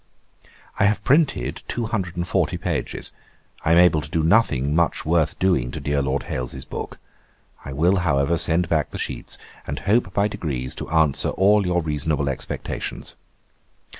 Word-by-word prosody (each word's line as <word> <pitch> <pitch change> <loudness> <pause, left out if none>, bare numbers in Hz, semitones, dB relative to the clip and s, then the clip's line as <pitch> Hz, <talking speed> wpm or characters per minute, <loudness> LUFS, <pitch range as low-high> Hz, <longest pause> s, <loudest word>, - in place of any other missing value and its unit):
'I 100 - +5
have 100 0 +1
printed 145 +2 +2
two 120 - -2
hundred 95 -6 -3
and 85 +1 -2
forty - - +1
pages. - - -3 0.5
I 80 - +2
am - - +5
able 85 -3 +5
to 75 - -9
do 80 0 0
nothing 80 - +3
much 85 +1 +1
worth 80 -1 +1
doing 90 -11 +2
to - - -5
dear 70 0 0
Lord 70 0 -1
Hailes's 65 +1 -5
book. - - -6 0.7
I 70 - -7
will, 85 +8 +2
however, 80 -2 +1
send 85 0 +1
back 80 -2 +1
the - - -7
sheets; - - -4 0.3
and 70 - -3
hope, 100 -2 +2
by 100 +3 +2
degrees, 65 -10 -4
to - - -7
answer 80 -4 +2
all 100 0 +3
your 90 -1 +1
reasonable 75 -2 -1
expectations. 65 - -5
80 Hz, 165 wpm, -23 LUFS, 70-95 Hz, 0.7 s, I